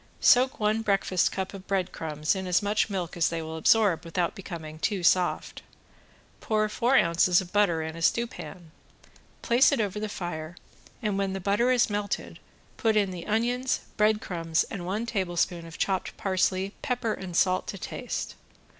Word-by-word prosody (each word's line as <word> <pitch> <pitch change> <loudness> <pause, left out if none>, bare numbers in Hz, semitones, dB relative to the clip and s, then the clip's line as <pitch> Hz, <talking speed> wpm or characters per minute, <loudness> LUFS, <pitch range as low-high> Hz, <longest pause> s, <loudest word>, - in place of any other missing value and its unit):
Soak 260 +3 +4
one 215 +1 +1
breakfast 195 -4 +1
cup 190 0 -4
of 195 -1 -10
bread 190 -2 0
crumbs 155 -1 -1
in 190 -1 -4
as 180 +3 +2
much 210 +1 +1
milk 185 -4 -3
as 170 -1 +2
they 165 - -3
will 160 0 -6
absorb 180 0 +3
without 170 +1 -1
becoming 160 -6 -8
too 195 +1 -1
soft. 180 +1 +1 0.8
Pour 215 -1 +1
four 250 +5 +2
ounces 170 0 +4
of 185 -1 -7
butter 185 -6 +2
in 160 0 -5
a 165 - -8
stewpan, 185 -5 -2 0.7
place 240 +5 +5
it 280 - +1
over 210 -1 -1
the 215 0 -3
fire, 175 -3 -5 0.5
and 205 -2 0
when 195 -1 -1
the 195 - -3
butter 205 +6 +1
is 250 -2 +4
melted 205 -1 -3 0.4
put 225 -2 +2
in 200 -2 +2
the 175 -2 -7
onions, 245 +4 0
breadcrumbs 185 -7 +1
and 180 -5 -5
one 210 +5 -2
tablespoon 175 -5 -1
of 165 - -10
chopped 190 -2 -1
parsley, 190 0 0
pepper 250 -4 -1
and 185 -4 -7
salt 185 -1 +2
to 195 - -5
taste. 245 +6 -5
195 Hz, 170 wpm, -27 LUFS, 175-215 Hz, 0.8 s, place